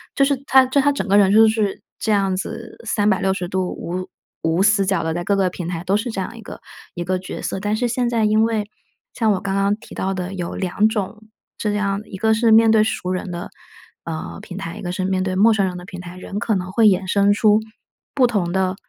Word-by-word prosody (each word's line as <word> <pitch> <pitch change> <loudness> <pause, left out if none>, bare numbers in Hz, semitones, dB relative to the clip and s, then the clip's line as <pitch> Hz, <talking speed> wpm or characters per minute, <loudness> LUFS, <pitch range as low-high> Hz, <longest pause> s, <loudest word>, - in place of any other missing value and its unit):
就 275 - +4
是 280 0 +2
他 265 0 +6
就 260 +2 +2
他 285 +1 +3
整 280 - -3
个 200 +1 +4
人 195 -2 +5
就 220 +2 +7
是 215 -3 0 0.2
这 220 - -1
样 195 -2 +2
子 185 - -6
三 210 -1 +2
百 190 -2 +1
六 190 0 +2
十 180 -2 -4
度， 185 0 -1
无 185 +2 -5 0.3
无 165 +3 +1
死 200 -1 +4
角 190 -3 0
地 160 0 -1
在 175 +1 -3
各 200 +3 +1
个 190 -2 +2
平 175 -1 -6
台 170 -1 -4
都 190 +2 +1
是 230 +3 -3
这 220 - -4
样 230 - -6
一 - - -10
个 200 - -10 0.3
一 175 - -3
个 185 +1 -1
角 185 - -7
色。 - - -3
但 210 +2 -1
是 245 +3 0
现 245 0 0
在 230 -2 +1
因 215 +1 +3
为， 220 -2 0 0.5
像 225 -3 +1
我 190 - -1
刚 195 0 -3
刚 200 +1 +2
提 215 - -14
到 190 +1 -2
的 185 0 -4
有 180 -3 -4
两 195 +3 +1
种 215 0 -4 0.3
这 210 - -1
样 200 -1 -1
一 190 - -8
个 220 +3 +2
是 225 +1 +3
面 225 0 +6
对 220 -1 +5
熟 185 -4 -2
人 185 +1 -3
的， 175 0 -6 0.6
呃， 160 -1 -5
平 185 - -9
台， 170 -4 -6
一 - - -8
个 175 - -4
是 185 +1 -3
面 190 0 0
对 185 -1 -2
陌 220 +4 +5
生 200 -3 +1
人 180 -1 -5
的 180 - -9
平 180 0 -9
台。 180 0 -9
人 195 +2 -5
可 225 -1 0
能 185 -1 -3
会 225 +3 +3
衍 190 -1 +3
生 200 +1 +3
出 210 0 +4 0.6
不 265 -3 +5
同 200 -7 -1
的 190 0 0
195 Hz, 280 characters per minute, -21 LUFS, 185-220 Hz, 0.6 s, 就